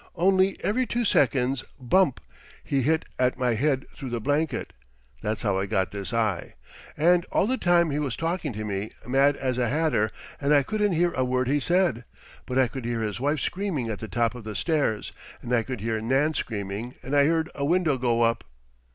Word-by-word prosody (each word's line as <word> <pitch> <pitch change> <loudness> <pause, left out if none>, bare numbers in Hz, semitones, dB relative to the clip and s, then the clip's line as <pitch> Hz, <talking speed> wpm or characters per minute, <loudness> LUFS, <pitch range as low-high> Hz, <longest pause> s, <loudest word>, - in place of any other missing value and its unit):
Only, 190 +2 +3
every 250 +4 +1
two 240 0 -1
seconds, 130 - +2 0.2
bump! 140 +3 +2 0.4
he 140 -1 0
hit 160 +4 +1
at 125 0 +2
my 125 -2 +1
head 135 +3 +1
through 135 - -6
the 120 -1 -2
blanket. 145 +1 -1 0.5
That's 105 0 -2
how 100 -3 +1
I 100 - -2
got 95 -3 0
this 100 -1 -5
eye. 110 - -1 0.4
And, 175 +3 +4
all - - +3
the 255 +5 +1
time, 175 - +3
he 145 - -1
was 140 -6 -2
talking 165 -2 -2
to 110 +1 -5
me, 100 0 -4
mad 135 +3 +4
as 130 -2 -2
a 120 -2 +1
hatter, 140 -7 +1 0.3
and 145 +1 +3
I 140 - +5
couldn't 210 +4 0
hear 175 +1 +2
a 130 - 0
word 125 0 0
he 145 +3 +2
said. 175 -6 +1 0.4
But 130 -1 -2
I 130 -1 +4
could 130 +1 -7
hear 115 -1 -1
his 105 0 -3
wife 145 +3 0
screaming 175 - -2
at 105 - -5
the 110 - -6
top 115 +4 0
of 120 -2 -9
the 105 -1 -6
stairs, 140 - 0 0.3
and 125 - -3
I 120 - +4
could 125 -1 -6
hear 110 0 -1
Nan 135 +7 +2
screaming, 110 -1 -4
and 135 +4 -2
I 140 0 +5
heard 160 0 +1
a 140 - -4
window 165 -1 +2
go 120 -1 +2
up. 115 0 +1
130 Hz, 210 wpm, -26 LUFS, 115-160 Hz, 0.5 s, I